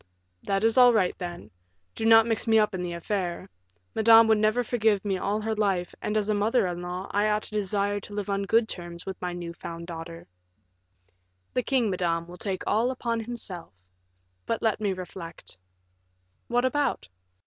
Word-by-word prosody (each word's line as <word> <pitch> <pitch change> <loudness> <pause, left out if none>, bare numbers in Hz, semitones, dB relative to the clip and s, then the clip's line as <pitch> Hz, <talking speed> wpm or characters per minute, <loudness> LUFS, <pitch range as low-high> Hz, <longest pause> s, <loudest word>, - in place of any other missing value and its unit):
"That 195 +1 -1
is 225 +3 +4
all 245 -1 +8
right, 190 -5 +2
then. 175 -1 -7 0.4
Do 220 - -4
not 225 0 +8
mix 230 0 -1
me 220 0 +5
up 210 -1 +3
in 185 - -3
the 175 -1 -3
affair; 180 +1 -3 0.5
Madame 225 +1 +7
would 220 -1 +4
never 215 +3 +2
forgive 215 -4 +1
me 195 -2 0
all 205 +3 -1
her 220 +1 -1
life, 195 -5 0
and 210 +1 -1
as 210 -1 0
a 215 - +2
mother 210 +3 +2
in 175 -1 -3
law, 180 +2 -5
I 205 +1 +2
ought 210 0 0
to - - -9
desire 205 0 0
to 205 - -11
live 205 -2 -3
on 200 0 0
good 225 +2 +3
terms 175 -2 -7
with 190 -1 -6
my 180 -1 -2
new 170 -1 -6
found 170 0 -8
daughter." 165 0 -8 1.3
"The 250 - +1
king, 245 -4 +1
madame, 170 -2 -1
will 175 +1 -11
take 190 0 -3
all 225 +4 +2
upon 235 -3 -2
himself. 210 - -6 0.7
But 230 - -2
let 220 -1 +1
me 205 -2 +1
reflect." 175 - -8 0.9
"What 245 +1 +1
about?" 285 - 0
205 Hz, 190 wpm, -27 LUFS, 180-225 Hz, 1.3 s, all